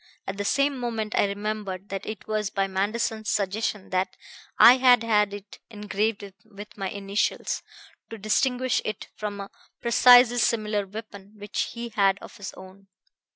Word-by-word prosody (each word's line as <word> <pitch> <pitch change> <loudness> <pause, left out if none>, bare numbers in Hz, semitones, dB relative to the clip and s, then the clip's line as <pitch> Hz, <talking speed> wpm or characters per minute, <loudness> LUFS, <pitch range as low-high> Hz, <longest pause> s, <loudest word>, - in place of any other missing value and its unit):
At 195 - -5
the 205 - -3
same 275 +3 +1
moment 225 -3 -3
I - - +3
remembered 200 -1 -4
that 195 +1 -5
it 215 -2 -7
was 215 -2 -1
by 195 -1 0
Manderson's 215 +3 -2
suggestion 205 0 -2
that 185 0 -1 0.4
I 250 +2 +9
had 250 -2 +5
had 210 -3 +2
it 205 0 -10
engraved 210 -1 -3
with 210 -1 -12
my 195 -2 -4
initials, 200 +1 -2 0.5
to 225 - -7
distinguish 250 +4 +1
it 215 -2 -5
from 205 -1 -5
a 195 - -9 0.3
precisely 245 0 +6
similar 210 -3 0
weapon 205 0 -10
which 205 0 -3
he 235 0 -6
had 200 -3 +2
of - - -12
his 200 -1 -7
own. 190 +1 -14
210 Hz, 155 wpm, -25 LUFS, 200-225 Hz, 0.5 s, I